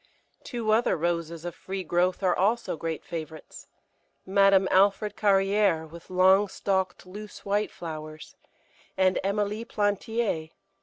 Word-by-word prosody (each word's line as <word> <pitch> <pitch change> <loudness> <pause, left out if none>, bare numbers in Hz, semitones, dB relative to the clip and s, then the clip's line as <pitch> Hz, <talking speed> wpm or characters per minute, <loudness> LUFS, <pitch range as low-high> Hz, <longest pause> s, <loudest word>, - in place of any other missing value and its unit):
Two 235 -4 -2
other 220 -3 +3
Roses 170 0 -2
of 175 - -4
free 190 0 -6
growth 180 +3 0
are 180 -2 +3
also 220 +3 +1
great 165 0 -5
favourites 160 -2 -8 0.6
Madame 195 0 +4
Alfred 200 +2 +3
Carrière, 195 -4 +2
with 170 +2 -13
long 190 +2 +4
stalked 190 -1 -2
loose 205 +3 -10
white 205 +1 0
flowers, 155 -2 -8 0.6
and 190 0 +3
Emilie 205 +2 -1
Plantier. 205 -5 -1
190 Hz, 120 wpm, -27 LUFS, 170-205 Hz, 0.6 s, Madame